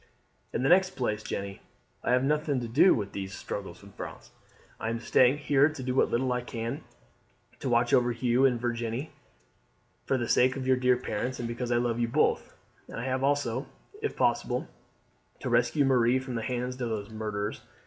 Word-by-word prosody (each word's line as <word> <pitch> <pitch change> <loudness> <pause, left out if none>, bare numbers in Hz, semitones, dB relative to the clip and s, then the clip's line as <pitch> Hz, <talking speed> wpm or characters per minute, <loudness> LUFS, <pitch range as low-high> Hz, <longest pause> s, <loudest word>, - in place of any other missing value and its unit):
"In - - -2
the 135 - +3
next 185 +1 +4
place, 110 -4 -1
Jeanne, 100 -2 -5 0.4
I - - +2
have 125 +1 +3
nothing 150 -1 +1
to 120 - -4
do 140 +11 +5
with 100 -2 -3
these 95 -1 -5
struggles 95 -2 -6
in 100 - -13
France. - - -9 0.5
I 115 - -2
am 115 0 -2
staying 130 +3 +4
here 145 0 +3
to 150 -4 -7
do 125 0 -1
what 135 - +3
little 125 +1 +1
I 125 - -1
can 120 +4 -5 0.8
to 130 - -3
watch 120 0 +2
over 120 -1 +4
you 120 +2 +1
and 125 -2 0
Virginie, 120 +3 -3 1.0
for 135 - +2
the 120 -2 -2
sake 130 +3 +3
of 135 -2 -4
your 130 0 +3
dear 125 -1 +3
parents 125 +1 -3
and 120 - -3
because 120 +1 -3
I 120 - +3
love 120 -1 0
you 120 - +1
both; 140 +6 +1 0.4
and - - -7
I 120 - -4
have 130 0 -1
also, 135 -2 0 0.3
if - - -3
possible, - - +1 0.7
to - - -4
rescue 145 -3 +3
Marie 125 -1 +4
from 130 -1 -5
the 115 - -2
hands 125 +1 -3
of 120 - -1 0.2
these 110 - -14
murderers. 105 -1 -3
125 Hz, 200 wpm, -28 LUFS, 115-130 Hz, 1.0 s, do